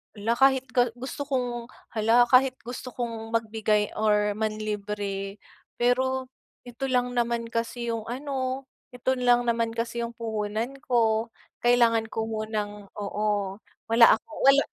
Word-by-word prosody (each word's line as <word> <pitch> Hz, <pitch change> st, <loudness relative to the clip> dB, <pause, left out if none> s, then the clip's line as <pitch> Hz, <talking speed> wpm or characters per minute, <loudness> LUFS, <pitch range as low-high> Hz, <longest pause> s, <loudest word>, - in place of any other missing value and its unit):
"hala 225 Hz, +3 st, -1 dB
kahit 265 Hz, -1 st, +5 dB
ga 245 Hz, -1 st, +3 dB
gusto 265 Hz, +3 st, -6 dB
kong 245 Hz, -3 st, -2 dB, 0.2 s
hala 225 Hz, +2 st, +4 dB
kahit 260 Hz, 0 st, +5 dB
gusto 245 Hz, +1 st, -7 dB
kong 230 Hz, -2 st, -4 dB
magbigay 215 Hz, -2 st, +1 dB
or 210 Hz, -1 st, +3 dB
manlibre 210 Hz, -2 st, -3 dB, 0.4 s
pero 260 Hz, +1 st, +1 dB, 0.3 s
ito 245 Hz, +2 st, -5 dB
lang 250 Hz, -1 st, +1 dB
naman 235 Hz, -1 st, -1 dB
kasi 235 Hz, +1 st, -2 dB
yung 225 Hz, -1 st, -4 dB
ano, 260 Hz, +1 st, -3 dB, 0.3 s
ito 250 Hz, +1 st, 0 dB
lang 245 Hz, -1 st, +4 dB
naman 230 Hz, -1 st, 0 dB
kasi 235 Hz, +1 st, -2 dB
yung 235 Hz, 0 st, -4 dB
puhunan 225 Hz, +3 st, -3 dB
ko, 225 Hz, -3 st, +2 dB, 0.3 s
kailangan 235 Hz, -2 st, +3 dB
ko 225 Hz, 0 st, -3 dB
munang 215 Hz, -2 st, -4 dB
oo 205 Hz, -1 st, -2 dB, 0.3 s
wala 230 Hz, -1 st, +8 dB
akong 305 Hz, +7 st, -11 dB
wala 275 Hz, +1 st, +7 dB
230 Hz, 135 wpm, -26 LUFS, 215-245 Hz, 0.4 s, wala